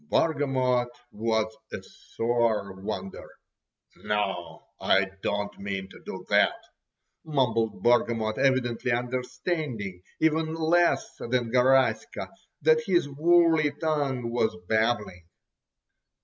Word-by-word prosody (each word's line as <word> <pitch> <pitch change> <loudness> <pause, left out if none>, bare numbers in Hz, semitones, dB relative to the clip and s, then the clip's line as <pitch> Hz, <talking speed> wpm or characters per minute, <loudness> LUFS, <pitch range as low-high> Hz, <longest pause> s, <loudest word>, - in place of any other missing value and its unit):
Bargamot 130 -6 +2 0.2
was 110 0 -1 0.2
a - - -4
sore 115 -4 -1
wonder! 95 0 -6 0.7
"No, 100 -4 -3 0.2
I 95 0 +2
don't 105 0 -2
mean 100 -1 -4
to - - -14
do - - -8
that," - - +4 0.7
mumbled 125 -7 0
Bargamot, 115 -2 +2
evidently 125 -3 +1
understanding, 125 - -3 0.2
even 160 0 +1
less 170 +2 +2
than 120 -1 -1
Garaska, 125 -2 +2 0.3
what 155 +1 +5
his 175 -6 +2
woolly 160 +1 +4
tongue 140 -7 -1
was 120 -2 0
babbling. 110 -6 0
120 Hz, 95 wpm, -27 LUFS, 110-145 Hz, 0.7 s, what